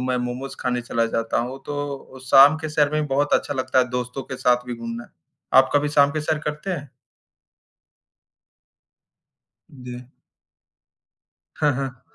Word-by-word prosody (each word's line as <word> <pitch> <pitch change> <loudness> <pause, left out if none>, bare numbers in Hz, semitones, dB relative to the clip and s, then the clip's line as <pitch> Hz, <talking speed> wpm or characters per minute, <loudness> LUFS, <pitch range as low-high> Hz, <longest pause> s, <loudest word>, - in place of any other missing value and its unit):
मैं 125 0 0
मोमोज़ 125 +2 -4
खाने 125 -1 -1
चला 115 -1 0
जाता 115 0 -1
हूँ, 125 +3 -5
तो 145 -2 -5
शाम 135 +4 +7
के 155 0 -4
सैर 150 -1 +2
में 155 0 0
बहुत 145 +1 0
अच्छा 145 - 0
लगता 130 -1 0
है, 125 -1 +3
दोस्तों 125 +1 -3
के 130 - -7
साथ 125 -1 +2
भी 125 - -4
घूमना। 115 0 -7 0.5
आप 130 - +5
कभी 145 0 +3
शाम 145 -1 +4
के 155 - -2
सैर 155 0 -1
करते 150 +5 -3
हैं? 145 -5 -4 2.8
जी। 125 -2 -9 1.6
हाँ, 150 -1 +3
हाँ। 130 -2 -5
135 Hz, 150 wpm, -23 LUFS, 125-145 Hz, 2.8 s, शाम